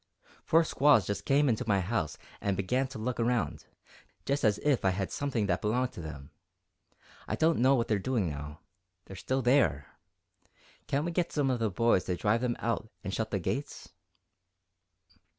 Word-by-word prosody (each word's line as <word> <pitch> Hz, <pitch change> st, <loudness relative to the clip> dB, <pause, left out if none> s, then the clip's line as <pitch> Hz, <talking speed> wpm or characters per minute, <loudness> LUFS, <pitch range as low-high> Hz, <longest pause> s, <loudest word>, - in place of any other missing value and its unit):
Four 165 Hz, +1 st, +4 dB
squaws 145 Hz, -, +4 dB
just 100 Hz, +1 st, -3 dB
came 145 Hz, +1 st, +3 dB
into 115 Hz, -4 st, +1 dB
my 100 Hz, -3 st, +3 dB
house 95 Hz, -4 st, -2 dB, 0.2 s
and 100 Hz, -2 st, -1 dB
began 125 Hz, +8 st, 0 dB
to 135 Hz, -, -9 dB
look 120 Hz, +3 st, -3 dB
around, 120 Hz, 0 st, 0 dB, 0.6 s
just 140 Hz, +1 st, 0 dB
as 105 Hz, -3 st, +3 dB
if 145 Hz, -3 st, +2 dB
I 95 Hz, -, +4 dB
had 95 Hz, +1 st, -2 dB
something 130 Hz, -7 st, -1 dB
that 90 Hz, -2 st, 0 dB
belonged 125 Hz, +4 st, 0 dB
to -, -, -9 dB
them. 75 Hz, -2 st, -9 dB, 1.0 s
I -, -, -1 dB
don't 160 Hz, +1 st, +2 dB
know 130 Hz, +3 st, +5 dB
what 120 Hz, -3 st, 0 dB
they're 105 Hz, -2 st, +1 dB
doing 110 Hz, -3 st, 0 dB
now 75 Hz, +1 st, -7 dB, 0.4 s
they're 95 Hz, -, -10 dB
still 130 Hz, +7 st, -2 dB
there. 115 Hz, -, +2 dB, 0.9 s
Can't 140 Hz, +3 st, 0 dB
we 175 Hz, -, -2 dB
get 170 Hz, 0 st, -1 dB
some 140 Hz, -3 st, +1 dB
of 125 Hz, -, -1 dB
the 110 Hz, -1 st, +1 dB
boys 100 Hz, 0 st, +2 dB
to 90 Hz, -, -1 dB
drive 105 Hz, +6 st, +1 dB
them 120 Hz, -2 st, 0 dB
out 115 Hz, -1 st, -2 dB
and 95 Hz, -1 st, -4 dB
shut 110 Hz, 0 st, -2 dB
the 100 Hz, -, -1 dB
gates?" 135 Hz, +10 st, -4 dB
115 Hz, 185 wpm, -30 LUFS, 95-135 Hz, 1.0 s, know